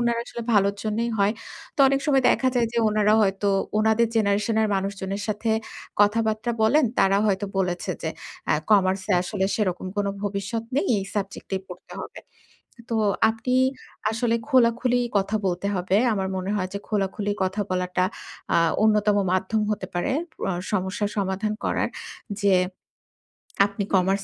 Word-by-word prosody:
উনারা 235 -1 +1
আসলে 235 - -6
ভালোর 200 -1 +3
জন্যেই 225 +2 -1
হয়। 200 +1 +3 0.4
তো 285 - 0
অনেক 275 0 +1
সময় 270 -2 +3
দেখা 260 - +2
যায় 240 -1 +2
যে, 235 - 0
উনারা 210 0 +3
হয়তো 195 0 +1 0.3
উনাদের 220 +2 +3
জেনারেশন 210 +1 +1
এর 215 - +1
মানুষজনের 195 +1 -3
সাথে 215 +2 -1 0.5
কথাবার্তা 220 +2 +2
বলেন। 290 +7 +4
তারা 195 0 +4
হয়তো 205 0 0
বলেছে 180 -2 -1
যে, - - -1 0.4
আ - - +5 0.2
কমার্স 190 -2 +4
এ - - +5
আসলে 190 +1 -2
সেরকম 190 -3 -1
কোন 205 -1 0 0.2
ভবিষ্যৎ 205 +3 -3
নেই। 295 - +2
এই 195 - -3
সাবজেক্ট 200 -1 -4
এ - - -1
পড়তে 180 - -11
হবে। - - -8 0.7
তো 230 - +1 0.3
আপনি 230 +3 -2 0.6
আসলে 230 +1 0
খোলাখুলি 245 -1 +3 0.2
কথা 200 +2 +1
বলতে 180 +1 -1
হবে। 185 +1 +1 0.2
আমার 190 -2 -1
মনে 185 +1 -3
হয় 185 -2 -1
যে, - - -1
খোলাখুলি 205 0 -1
কথা 190 +3 -1
বলাটা 180 0 0 0.5
আ - - +6 0.3
অন্যতম 210 -1 +3 0.2
মাধ্যম 190 +4 +1
হতে 200 -3 -2
পারে 175 +10 0 0.4
আ - - 0 0.2
সমস্যার 200 +1 -1
সমাধান 195 +2 -1
করার। - - 0 0.5
যে, 200 -2 +4 1.1
আপনি 200 0 -4
কমার্স 195 +1 +2
205 Hz, 155 wpm, -24 LUFS, 190-220 Hz, 1.1 s, আ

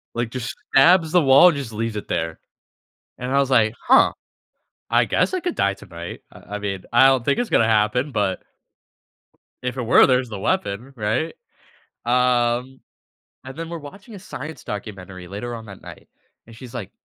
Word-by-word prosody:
Like, 120 -1 -2
just 125 0 -5 0.2
stabs 165 +3 +5
the 180 - +5
wall 140 +5 +7
and 150 - -2
just 120 -6 -6
leaves 115 0 -3
it 105 - -5
there, 80 0 -3 0.8
and 125 +1 -4
I 140 - +3
was 135 -1 +1
like, 115 -3 +3
"Huh, - - +6 0.8
I - - +3
guess - - 0
I 370 - 0
could 355 -1 -3
die 100 - +1
tonight. 85 -4 -9
I 105 - -10
I - - -4
mean, 100 -2 -4
I 120 +3 +6
don't 130 -3 +3
think 140 - +1
it's 245 - -1
gonna 115 - +3
happen, 110 +6 +1
but" 100 -5 -1 1.2
"if 125 +1 -3
it 125 - -2
were, 115 - +6
there's 125 -2 +1
the 105 -3 -6
weapon," 105 +8 -2
right? 110 +9 -1 0.7
Um, 125 +1 +1 0.6
and 130 +2 -9
then 165 0 -5
we're 170 -1 -5
watching 195 +9 -12
a - - -8
science 160 -4 -8
documentary 95 -3 -7
later 120 +5 -6
on 115 -1 -9
that 100 -2 -12
night, - - -12 0.4
and 115 - -14
she's 125 -1 -11
like, 100 -5 -6
120 Hz, 185 wpm, -22 LUFS, 105-135 Hz, 1.2 s, wall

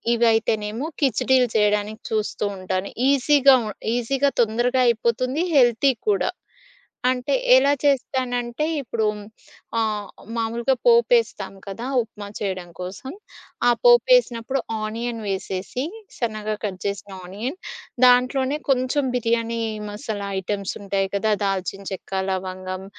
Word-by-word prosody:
ఇవయితేనేమో 225 +1 +1 0.2
ఖిచిడిలు 260 -2 +3
చేయడానికి 210 +1 +1
చూస్తూ 215 -1 -1
ఉంటాను. 185 +1 -3 0.2
ఈజీగా 280 0 +5
ఉన్ 210 - -5 0.2
ఈజీగా 275 +4 +1
తొందరగా 240 +3 +1
అయిపోతుంది 240 +6 +1
హెల్తీ 245 +1 +4 0.2
కూడా. 400 - +2 0.8
అంటే 255 +2 -1 0.2
ఎలా 275 +2 +5
చేస్తానంటే, 255 -1 0 0.2
ఇప్పుడు 230 -3 -2 0.7
ఆహ్, 215 -2 -1 0.3
మామూలుగా 235 +3 0
పోపేస్తాం 470 - +3
కదా! 195 +5 -6 0.2
ఉప్మా 210 -2 -10
చేయడం 185 -3 -3
కోసం. 190 +9 -6 0.6
ఆ - - +7 0.2
పోపేసినప్పుడు 480 - +4 0.2
ఆనియన్ 230 +2 -3
వేసేసి 195 +6 -3 0.3
సన్నగా 215 -2 -2
కట్ 190 -3 -3
జేసిన 200 0 -4
ఆనియన్ 220 - -5 0.5
దాంట్లోనే 255 +3 +3
కొంచెం 260 +2 +2
బిర్యానీ 230 -1 0 0.3
మసాలా 205 -1 -5
ఐటెమ్సుంటాయి 195 0 -2
కదా! 215 +2 +2
దాల్చిన 195 0 -2
చెక్క, 190 0 -7 0.2
లవంగం 185 0 -4
230 Hz, 105 wpm, -23 LUFS, 205-260 Hz, 0.8 s, ఆ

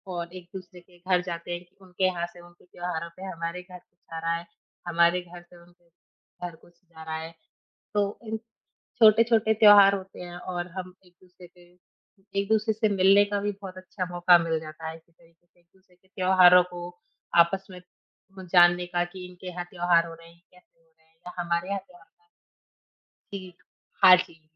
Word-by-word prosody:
और 170 0 -5
एक-दूसरे 180 0 -11
के 175 0 -23
घर 180 0 +1
जाते 170 -1 -6
हैं 175 0 -4
कि 175 - -36
उनके 185 0 -2
यहाँ 175 -2 0
से 175 - -15
उनके 175 0 -19
त्योहारों 175 -2 -5
पे 190 - -10
हमारे 170 -1 -5
घर 180 0 -12
कुछ 175 - -40 0.2
आ - - -3
रहा 165 +1 -1
है, 170 - -10 0.4
हमारे 170 +1 +3
घर 175 0 -13
से 175 0 -19
उनके 175 0 -24 0.6
घर 170 - -11
कुछ 175 - -23
जा 165 -3 -14
रहा 160 0 -5
है। 160 +1 -7 0.6
तो 205 -1 0
इन 220 0 -3 0.6
छोटे-छोटे 220 0 +5
त्योहार 205 -2 +7
होते 190 -1 -8
हैं 175 0 -8
और 175 -1 -5
हम 185 0 -7
एक-दूसरे 180 0 -18
के 175 0 -22 0.7
एक-दूसरे 215 +2 +1
से 220 0 +1
मिलने 195 +2 +6
का 205 0 -2
भी 205 +1 -2
बहुत 185 -1 -8
अच्छा 185 0 -5
मौका 175 0 +5
मिल 165 -1 -1
जाता 160 +1 -8
है। 160 - -7
इस 165 - -19
तरीके 170 0 -28
से 175 - -34
एक-दूसरे 180 +1 -30
के 190 +1 -34
त्योहारों 185 -1 +6
को 175 0 -7 0.6
आपस 195 +3 -5
में 180 - -10 0.6
ब 185 - -9
जानने 175 0 +5
का 175 0 -1
कि 180 +1 -10
इनके 180 0 -14
यहाँ 180 0 -5
त्योहार 175 -1 +2
हो 165 - -9
रहे 165 0 -16
हैं, 170 - -25
कैसे 180 -2 -25
हो 165 0 -35
रहे 160 - -32
हैं। 160 - -35
या 180 - -7
हमारे 170 +1 -2
यहाँ 200 0 -2
त्योहार 175 -2 -20 1.3
जी, 185 -2 -8 0.5
हाँ 185 -1 +10
जी। 165 -3 -21
180 Hz, 195 wpm, -26 LUFS, 170-185 Hz, 1.3 s, हाँ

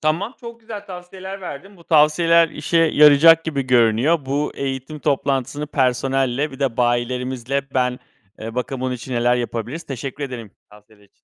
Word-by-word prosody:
Tamam, 170 - -1
çok 235 -1 -10
güzel 220 -2 -9
tavsiyeler 190 +1 -9
verdin. 185 +3 -9
Bu 170 - -19
tavsiyeler 165 +2 +4
işe 155 +2 -3
yarayacak 160 0 +6
gibi 145 -4 -2
görünüyor. 125 +5 +3
Bu 145 +2 -1
eğitim 135 +2 -5
toplantısını 140 0 -1
personelle 135 +1 0
bir 135 - -11
de 130 -4 -1
bayilerimizle 125 +2 -1
Ben, 125 -1 0 0.4
eee, 115 +1 -7
bakayım 125 +1 -3
bunun 130 -1 -1
için 125 +1 -8
neler 120 +1 +2
yapabiliriz? 120 +6 -4
Teşekkür 135 +1 -6
ederim 120 -6 -8 0.2
tavsiyeler 105 0 -20
için. 100 - -27
140 Hz, 155 wpm, -20 LUFS, 125-165 Hz, 0.4 s, yarayacak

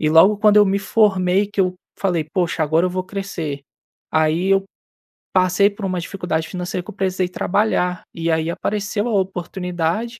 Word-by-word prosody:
e 155 - +2
logo 190 +6 +6
quando 210 0 +4
eu 210 - +7
me 195 +1 +1
formei 195 -2 +2
que 205 -1 -2
eu 185 -1 +1 0.2
falei: 175 -5 0
"Poxa, 165 0 -1
agora 160 +4 +2
eu 180 - -2
vou 185 0 -3
crescer", 180 -7 -5 0.5
aí 160 +4 +1
eu 195 0 +3 0.7
passei 185 +2 +4
por 200 0 -7
uma 185 -2 -1
dificuldade 170 -3 -3
financeira 180 -1 -4
que - - -13
eu - - -17
precisei 190 -1 0
trabalhar 180 -2 0
e 165 0 -1
aí 160 +1 0
apareceu 205 +3 -2
a 230 - -1
oportunidade 180 +4 -3
185 Hz, 175 wpm, -20 LUFS, 170-200 Hz, 0.7 s, eu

